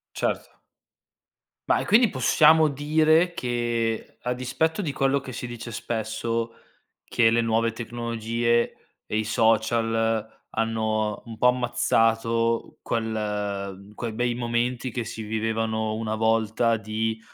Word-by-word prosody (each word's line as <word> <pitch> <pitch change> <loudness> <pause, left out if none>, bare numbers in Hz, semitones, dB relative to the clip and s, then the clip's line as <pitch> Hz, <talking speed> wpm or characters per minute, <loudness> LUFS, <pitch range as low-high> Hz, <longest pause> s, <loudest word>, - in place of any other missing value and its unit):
Certo. - - -3 1.1
Ma, - - +4
e - - -2
quindi 225 +3 +5
possiamo 155 +1 +5
dire 155 +4 +3
che 120 -5 -2
a 125 - -1
dispetto 160 +9 -1
di 150 -6 -2
quello 135 +1 +1
che 130 -1 -8
si 125 - -5
dice 120 0 -7
spesso, 115 +1 -3 0.5
che 115 -2 +3
le 115 0 +2
nuove 115 0 +1
tecnologie 115 0 -1 0.3
e 110 - -3
i 110 - +1
social 115 0 +2 0.3
hanno 110 -1 -1
un 115 -1 -9
po' 125 - +5
ammazzato 115 -2 +1
quel 105 -3 -3
quei 115 0 -4
bei 120 +2 0
momenti 120 +1 -1
che 120 0 -3
si 115 - -6
vivevano 110 0 -1
una 110 0 -2
volta 115 +1 +2
di, 110 +1 -2
115 Hz, 125 wpm, -25 LUFS, 110-120 Hz, 1.1 s, quindi